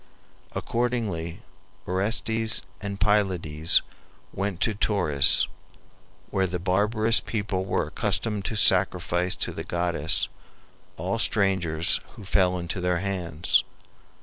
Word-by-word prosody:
Accordingly 110 -9 -2 0.4
Orestes 110 +4 0 0.2
and 100 -1 -5
Pylades 90 -7 +2 0.5
went 100 -2 -3
to 110 - +2
Tauris, 90 -9 +3 0.9
where 95 -1 +1
the 90 0 -3
barbarous 105 +5 +3
people 100 -4 -3
were 95 - 0
accustomed 105 -3 0
to 110 - -2
sacrifice 90 -2 +2
to - - -2
the - - -6
goddess 85 -3 0 0.7
all 95 +7 -2
strangers 95 -7 +2 0.2
who 100 - -11
fell 90 -2 +2
into 85 +1 -4
their 90 0 +1
hands. 90 -4 0
95 Hz, 105 wpm, -25 LUFS, 85-105 Hz, 0.9 s, Tauris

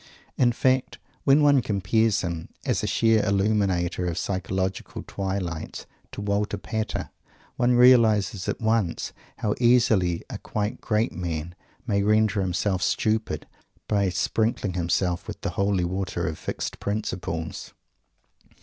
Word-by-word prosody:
In 120 -2 +3
fact, 130 +2 +1 0.3
when 145 +2 +5
one 140 -2 +5
compares 105 +1 +1
him, 85 -2 -4 0.2
as - - +1
a - - 0
sheer 115 -2 +3
illuminator 100 -3 +1
of 85 -1 -2
psychological 95 0 -2
twilights, 95 -4 -4 0.3
to - - -6
Walter 100 0 -1
Pater, 110 +2 -3 0.4
one 125 0 +3
realizes 110 -6 +5
at - - -2
once 110 -6 0 0.2
how 105 - 0
easily 115 -8 +3
a - - -7
quite 105 0 -3
great 110 +1 +1
man 85 -1 -4 0.3
may 100 -4 +1
"render 105 0 +3
himself 95 +1 0
stupid" 110 +2 0 0.4
by 100 -2 +2
sprinkling 105 +1 0
himself 85 0 0
with - - -6
the - - -2
holy 100 -2 +1
water 90 -1 -2
of 80 - -4
Fixed - - -4
Principles! 90 -6 -4
100 Hz, 130 wpm, -25 LUFS, 90-110 Hz, 0.4 s, when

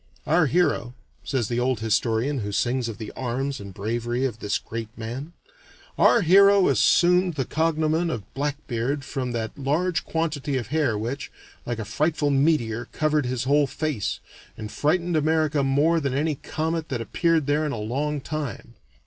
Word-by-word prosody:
"Our 160 0 +3
hero," 135 -6 +1 0.3
says 130 -6 -1
the 120 +1 -1
old 125 -2 +1
historian 115 +5 +1
who 105 -2 -3
sings 120 +3 0
of 110 - -6
the 110 -2 -7
arms 130 +2 -3
and 100 -1 -8
bravery 120 +6 -2
of 115 -4 -3
this 100 -1 0
great 115 -1 -6
man 125 +8 -6 0.6
"our 235 - +5
hero 200 +2 +6
assumed 180 0 +4
the 135 -3 -1
cognomen 160 +2 +1
of 115 -10 -3
Blackbeard 140 -1 -2
from 130 -4 -3
that 110 -1 -3
large 160 +6 0
quantity 150 -4 -2
of 120 -3 -4
hair 145 -7 +1
which, 125 +7 -4 0.4
like 120 -1 -2
a 110 - -4
frightful 145 +6 0
meteor, 135 -5 +1
covered 150 0 0
his 125 0 -2
whole 145 +2 +3
face, 135 -5 -2 0.4
and 110 -1 -6
frightened 170 +3 0
America 155 -1 +2
more 145 +5 +3
than 140 -4 -2
any 155 +2 +1
comet 160 +3 -3
that 130 - -2
appeared 160 - +1
there 145 +2 +1
in 150 - -1
a 120 - -3
long 140 +7 -2
time. 150 -5 -5
140 Hz, 165 wpm, -24 LUFS, 120-155 Hz, 0.6 s, hero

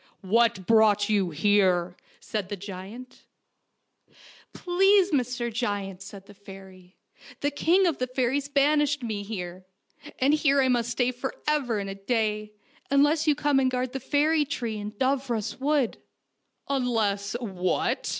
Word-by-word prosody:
" - - -42 0.2
What 230 -5 +2
brought 215 -2 +4
you 200 -4 +2
here? 180 0 +2
" - - -30
said 210 -4 -4
the 205 - -3
giant. 200 +6 -10 0.7
" - - -51 0.5
Please, 390 +2 +3
Mr. 245 -4 -1
Giant/' 205 -5 -3
said 195 0 -11
the 205 - -15
fairy, 190 -2 -14 0.2
" - - -18
the 285 - 0
king 345 +6 +2
of 335 -5 0
the 255 - -1
fairies 260 +2 -1
banished 290 0 +2
me 215 -3 -3
here, 185 -3 -6 0.5
and 275 +3 +3
here 280 -2 +3
I 260 -1 +3
must 240 -2 +1
stay 245 +1 0
for 255 +2 -5
ever 280 -7 0
and 200 -1 -3
a 195 - -4
day, 215 +1 -2 0.4
unless 290 +3 +3
you 300 - +4
come 290 -2 +2
and 260 -1 +2
guard 255 0 -2
the 270 - -3
fairy 300 +3 +2
tree 235 -6 -4
in 210 +1 -6
Dooros 255 -2 -1
Wood." 280 -3 0 0.4
" - - -51
Unless 225 -7 0
what? 185 -6 -1
235 Hz, 160 wpm, -26 LUFS, 205-280 Hz, 0.7 s, brought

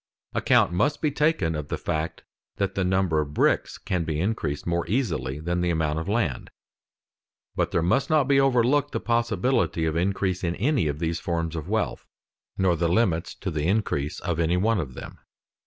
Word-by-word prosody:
Account - - +3
must 145 +11 +1
be 150 - 0
taken 150 - +1
of 75 -2 -4
the - - -3
fact 80 +1 -3 0.3
that 100 -1 -1
the 95 - 0
number 90 -4 +2
of 75 0 -6
bricks - - +2
can 90 -3 -2
be 80 -2 -2
increased 90 -7 -2
more 85 0 0
easily 85 - -1
than 85 +3 -1
the 90 - +1
amount 80 -2 0
of 80 - -5
land; 100 - -1 1.1
but - - +1
there 85 - 0
must 90 +11 +1
not 155 -2 +4
be 140 -1 +4
overlooked 135 +1 +3
the - - 0
possibility 115 -5 +1
of 80 -1 -1
increase 95 +1 0
in 85 0 0
any 125 - +1
of 70 -1 -2
these 85 +1 -2
forms 85 -1 -2
of 80 -2 -5
wealth, - - -1 0.5
nor 95 -2 +3
the 85 +1 0
limits 90 -2 +1
to 95 - -4
the 75 0 -1
increase 90 -8 0
of 85 -3 -2
any 85 +2 +2
one 110 +3 +2
of 65 -6 -5
them. - - -9
90 Hz, 190 wpm, -25 LUFS, 80-115 Hz, 1.1 s, not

